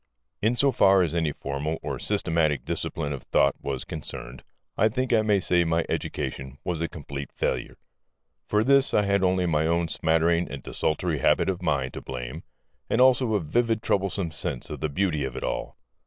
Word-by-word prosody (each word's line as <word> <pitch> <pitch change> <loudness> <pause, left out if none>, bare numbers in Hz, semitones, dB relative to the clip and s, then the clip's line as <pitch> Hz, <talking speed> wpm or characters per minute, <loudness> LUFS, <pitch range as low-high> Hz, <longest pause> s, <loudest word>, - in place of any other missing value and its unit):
In 110 +4 +2
so 140 +2 +3
far 95 -5 +5
as 85 -3 -1
any 80 -3 +1
formal 70 +3 -3
or - - -3
systematic 80 -9 0
discipline 75 -3 -3
of 70 - -6
thought - - +2
was 70 -2 -3
concerned, 65 -5 -6 0.3
I 110 - +3
think 130 +2 -1
I 110 - +5
may 105 -2 +3
say 90 -1 +3
my 80 0 +1
education 65 +1 -4
was 85 -3 -2
a 85 - 0
complete 70 -5 -7
failure. - - -2 0.7
For 105 +1 +2
this 140 +2 +4
I 105 - +4
had 100 -1 +2
only 90 -1 +2
my 80 -2 +1
own 85 0 +1
smattering 85 +2 +2
and 70 -2 -7
desultory 80 0 -1
habit - - +3
of 90 -1 -2
mind 70 -6 0
to - - -6
blame 65 -2 -6 0.5
and - - +1
also 125 -3 +4
a - - +3
vivid 115 +7 0
troublesome 95 -4 0
sense 65 - -4
of - - -5
the 75 - -1
beauty 75 -1 0
of 65 -2 -4
it - - -5
all. - - -3
85 Hz, 190 wpm, -26 LUFS, 75-100 Hz, 0.7 s, far